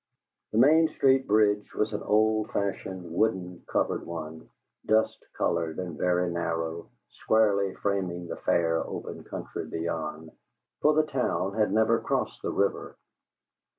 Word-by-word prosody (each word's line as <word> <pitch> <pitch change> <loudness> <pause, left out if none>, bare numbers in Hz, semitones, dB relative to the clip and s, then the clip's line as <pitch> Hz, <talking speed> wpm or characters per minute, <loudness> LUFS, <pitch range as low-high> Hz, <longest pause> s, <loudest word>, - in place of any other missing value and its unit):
The 110 - -1
Main 155 +7 +6
Street 135 -3 +2
bridge 105 0 +2
was 110 +1 0
an 105 - -2
old 110 +1 +2
fashioned, 95 -5 -3
wooden, 90 -3 -1
covered - - 0
one, 80 -1 -7 0.3
dust 110 0 +1
colored 85 -2 0
and 90 -3 -4
very 90 +3 +1
narrow, 85 -1 -3 0.2
squarely 100 -3 +2
framing 90 -3 -2
the - - -5
fair, 80 -1 +1
open - - -7
country - - -6
beyond; 80 -1 -4 0.5
for 150 0 +4
the 155 0 +4
town 125 -9 -1
had 105 -2 +1
never 110 +1 +3
crossed - - -2
the - - -2
river. 100 - -1
95 Hz, 135 wpm, -28 LUFS, 85-110 Hz, 0.5 s, Main